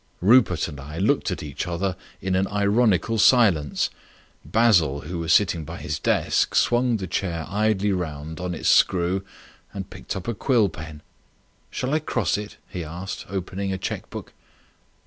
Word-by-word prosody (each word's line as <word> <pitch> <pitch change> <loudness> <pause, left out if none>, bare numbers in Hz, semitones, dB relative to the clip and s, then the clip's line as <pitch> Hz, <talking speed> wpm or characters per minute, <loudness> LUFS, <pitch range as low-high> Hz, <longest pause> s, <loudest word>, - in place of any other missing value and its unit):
Rupert 105 -4 +4
and 75 -3 -8
I 75 +3 -8
looked - - +1
at - - -4
each 75 +1 -5
other 90 +1 -1 0.3
in 95 +1 -1
an 95 +1 +2
ironical 105 +1 +2
silence. 100 - +4 0.5
Basil, 85 -6 +3
who 85 +3 -5
was 85 0 -1
sitting 90 -5 +3
by - - -7
his 75 +1 -4
desk, - - +1
swung 120 -1 +3
the 95 - -4
chair 90 -2 -2
round - - -11
idly 105 -1 +1
on 85 0 -4
its - - -3
screw 90 +2 +3 0.5
and - - -7
picked - - -6
up 95 +1 -6
a 120 - 0
quill 115 -2 +2
pen. 75 -2 -9 0.7
"Shall 130 +3 -3
I 155 - +3
cross 120 - 0
it?" 105 +1 -6
he 90 -3 -5
asked, 85 +5 -6
opening 95 0 -3
a 95 - -2
cheque 95 - -5
book. - - -8
95 Hz, 165 wpm, -24 LUFS, 80-105 Hz, 0.7 s, Rupert